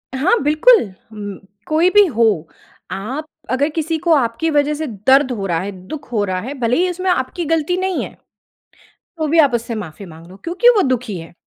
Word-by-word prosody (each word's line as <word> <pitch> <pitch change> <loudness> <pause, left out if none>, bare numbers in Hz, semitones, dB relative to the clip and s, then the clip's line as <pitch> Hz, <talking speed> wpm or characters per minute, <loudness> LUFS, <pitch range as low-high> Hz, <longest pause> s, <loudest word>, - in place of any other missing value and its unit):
हाँ, 360 - +2
बिल्कुल, 305 - +4 0.2
म 205 -2 -7 0.3
कोई 320 +4 +3
भी 415 +1 +6
हो 235 -6 +2 0.7
आप 255 +11 -4 0.3
अगर 280 +4 +1
किसी 320 +1 -2
को 340 -2 +4
आपकी 265 +4 0
वज़ह 295 0 +2
से 310 +1 -3
दर्द 260 +6 +3
हो 205 -5 -3
रहा 165 -2 0
है, 200 +3 -4 0.2
दुःख 300 -2 -7
हो 210 -3 +1
रहा 185 -1 -2
है, 255 +7 -5
भले 235 +1 +1
ही 365 +2 +2
इसमें 365 +1 -2
आपकी 335 +3 -2
गलती 325 +3 0
नहीं 375 -1 -1
है। - - -9 1.0
तो 315 -1 -1
भी 325 +3 +3
आप 285 -5 +5
उससे 235 0 -2
माफ़ी 200 -2 -7
माँग 165 -1 -13
लो 190 - -13
क्योंकि 365 +8 +3
वो 410 - +4
दुखी 245 -6 -2
है। 165 +1 -11
280 Hz, 205 wpm, -18 LUFS, 215-325 Hz, 1.0 s, भी